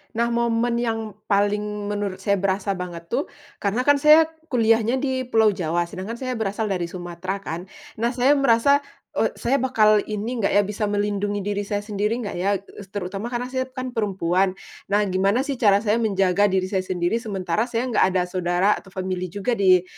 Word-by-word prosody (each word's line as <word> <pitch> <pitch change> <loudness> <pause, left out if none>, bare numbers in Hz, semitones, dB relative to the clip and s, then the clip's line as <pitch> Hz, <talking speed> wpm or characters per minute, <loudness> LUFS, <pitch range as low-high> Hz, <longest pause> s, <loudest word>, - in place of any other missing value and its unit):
Nah, 235 +1 +1
momen 235 0 +1
yang 225 -3 -3
paling 205 0 0
menurut 205 -2 -3
saya 200 -2 +2
berasa 195 +1 0
banget 170 -2 -7
tuh, 270 +5 0 0.3
karena 210 +5 0
kan 290 0 +4
saya 305 +2 +7 0.2
kuliahnya 230 -2 +2
di 260 -2 -1
Pulau 220 -3 +4
Jawa, 175 -3 -1
sedangkan 185 +6 -6
saya 255 -1 -4
berasal 210 0 -2
dari 175 -2 -1
Sumatera 180 +2 -5
kan. 170 +4 -5 0.3
Nah, 240 +2 0
saya 260 +3 +4
merasa, 275 +2 +4 0.4
eee, - - +1
saya 275 +3 0
bakal 215 -5 +4
ini 220 +3 -3
enggak 200 - +1
ya, 205 - +5
bisa 210 +1 -2
melindungi 205 -1 -1
diri 205 0 -2
saya 205 0 -2
sendiri 210 +1 -1
enggak 205 - -5
ya, 200 +2 +2
eee, 195 +1 -10
terutama 195 +3 -5
karena 245 +1 -4
saya 260 0 -1
kan 255 -1 -6
perempuan. 190 -4 0 0.3
Nah, 205 +1 +2
gimana 195 +7 +2
sih 280 -3 -4
cara 205 -1 +4
saya 220 +2 +2
menjaga 195 -2 +2
diri 190 -1 0
saya 190 -1 0
sendiri, 180 +4 0
sementara 205 0 -2
saya 235 0 -1
enggak 220 - +4
ada 180 - +3
saudara 180 +1 0
atau - - -20
family 185 -1 -3
juga 200 +7 -3
di 185 -2 +5
205 Hz, 185 wpm, -23 LUFS, 190-235 Hz, 0.4 s, saya